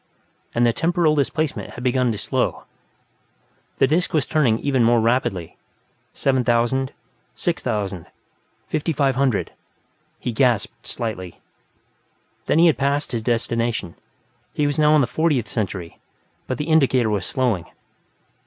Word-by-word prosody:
and 120 +1 +3
the 120 - +3
temporal 165 0 +2
displacement 155 +1 -1
had - - -12
not - - -7
begun 125 -1 +2
to 105 - -3
slow. 105 - -1 1.1
The - - +5
disc 160 +5 +1
was 150 -4 +2
turning 130 -8 +2
even 135 -1 +1
more 120 +1 +4
rapidly 110 -7 0 0.6
7000, 130 0 +1 0.4
6000, 95 -5 -2 0.6
5500; 140 - 0 0.7
he 120 - -3
gasped 120 -3 0
slightly. 95 -7 -5 1.1
Then - - +2
he 170 - +6
had 160 -5 +3
passed 140 +1 0
his 115 -3 -2
destination; 115 -4 -1 0.6
he 150 - +1
was 145 +1 0
now 150 0 +5
in 150 - +5
the - - +3
Fortieth 145 -6 0
Century, 95 -5 -4 0.5
but 130 - -2
the 150 - -3
indicator 135 -8 +3
was 100 -4 -1
slowing. 120 -10 0
125 Hz, 130 wpm, -22 LUFS, 115-145 Hz, 1.1 s, he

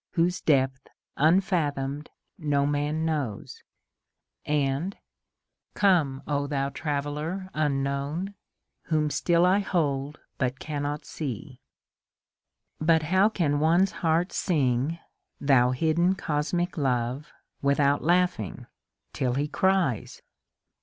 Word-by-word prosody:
Whose 175 +1 +1
depth 135 -3 +1 0.3
unf 180 +7 +3
athomed 145 -3 -1 0.3
no 145 -3 +1
man 145 +2 0
knows! 145 -10 -3 0.5
— - - -55 0.2
and 155 +9 -3 0.8
Come, 160 -10 +2
O 145 -1 -1
thou 140 -1 -1
traveUer 150 +6 -3
unknown, 145 +5 -1 0.5
Whom 155 -2 +1
still 170 +2 +3
I 185 +2 +4
hold 150 -7 -1 0.2
but 130 0 -1
cannot 145 -1 -4
see 130 -2 -6
I 135 - -19
But 160 -1 +4
how 195 +3 +5
can 150 -9 0
one's 170 +5 +3
heart 170 +2 +2
sing, 135 -7 +1
^* 170 - -12 0.4
Thou 130 -3 +4
hidden 165 +7 +2
cosmic 165 +1 -1
Love 130 +2 -1
" - - -48
without 140 0 +2
laughing 175 - +1 0.5
(till 125 -2 -1
he 145 +2 0
cries 185 - 0
150 Hz, 110 wpm, -27 LUFS, 140-170 Hz, 0.8 s, how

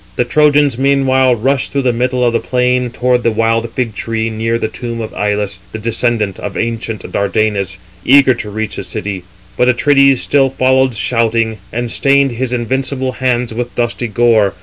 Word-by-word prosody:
[The 125 - +1
Trojans] 145 -1 +3
meanwhile 130 -2 +3
rushed 130 +4 -1
through 140 -1 -1
the 125 -1 +1
middle 125 +1 0
of 120 - +1
the 115 - +2
plain 125 0 0
towards 125 +1 0
the 120 - +2
wild 115 +1 0
fig 115 -2 -3
tree, 115 +2 -3
near 115 +1 -1
the 110 - -2
tomb 115 +1 -6
of 110 -1 -6
Ilus, 105 -1 -2
the - - -3
descendant 115 -2 -1
of 100 -2 -6
ancient 115 -1 -3
Dardanus, 100 -2 -1 0.3
eager 135 0 +5
to 110 -3 -6
reach 110 +1 -4
the - - -4
city; 95 0 -5 0.3
but 125 - +3
Atrides 140 +1 +4
still 135 -2 +2
followed 130 -1 +2
shouting, 115 -1 0
and 120 0 -3
stained 140 +1 +2
his 120 +1 -3
invincible 130 +2 -1
hands 125 -2 -1
with 120 +1 -5
dusty 120 0 -2
gore. 110 -2 +2
120 Hz, 175 wpm, -14 LUFS, 110-130 Hz, 0.3 s, eager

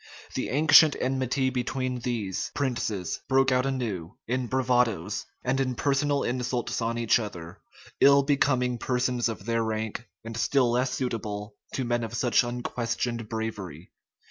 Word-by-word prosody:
The - - -2
ancient 155 +2 +6
enmity 130 0 0
between 130 0 -2
these, 115 -6 -2
princes 115 - -2
broke 135 0 +3
out 130 +1 +2
anew 110 -10 -3
in 125 +1 -1
bravadoes, 120 -7 0 0.2
and 130 +2 0
in 130 -2 0
personal 140 +2 +1
insults 125 -1 -2
on 115 +1 -1
each 120 0 +3
other, 90 -6 -7 0.4
ill 140 0 +6
becoming 130 -3 +1
persons 125 -1 0
of 100 -4 -6
their 115 0 +1
rank, 110 +1 -3 0.2
and 115 0 -7
still 120 +3 +2
less 125 +2 +1
suitable 105 -5 -3 0.2
to 130 - -1
men 120 0 0
of 115 +1 -5
such 120 +1 +3
unquestioned 120 -1 -3
bravery. 100 -8 -5
120 Hz, 145 wpm, -27 LUFS, 115-130 Hz, 0.4 s, ancient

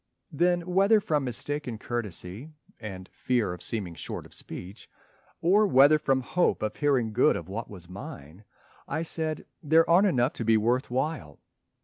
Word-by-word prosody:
Then 175 +3 +2
whether 195 +5 +3
from 155 -9 0
mistaken 130 0 -3
courtesy 105 - -4 0.3
And 95 -4 -8
fear 120 -8 -1
of 90 - -10
seeming 100 -7 -2
short 85 - -6
of - - -16
speech, 95 +5 -9 0.5
or 205 +5 +4
whether 145 0 +6
From 135 -3 +1
hope 175 -1 0
of 110 - -3
hearing 130 -7 +1
good 130 +7 +4
of 85 +1 -6
what 110 +4 -5
was 90 -4 -11
mine, 90 -1 -10 0.4
I 160 - -2
said, 160 -2 -2 0.2
"There 160 +2 +4
aren't 180 +5 +5
enough 130 -6 +1
to - - -4
be 110 0 +4
worth 120 +5 +1
while." 130 - -3
125 Hz, 160 wpm, -27 LUFS, 105-160 Hz, 0.5 s, whether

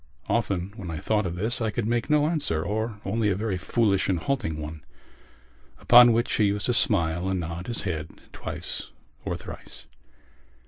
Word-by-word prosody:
Often 100 -4 -1
when 95 -4 -6
I 80 - -4
thought 105 +2 0
of 85 - -4
this 110 +7 -1
I 110 - +1
could 110 +1 -2
make 120 +1 0
no 150 -1 +4
answer 145 - 0
or 110 +1 -2
only 105 +2 +1
a 95 - +1
very 100 -2 -2
foolish 100 -1 +1
and 95 - +2
halting 95 - -2
one 75 0 -7 1.0
upon 120 0 +8
which 115 +1 +1
he 105 - +3
used 100 0 0
to 125 - +2
smile 90 - +2
and 95 -1 0
nod 85 +1 -5
his 120 -1 -2
head 80 -6 -3 0.2
twice - - -5 0.4
or - - -1
thrice. - - -10
100 Hz, 180 wpm, -26 LUFS, 90-115 Hz, 1.0 s, upon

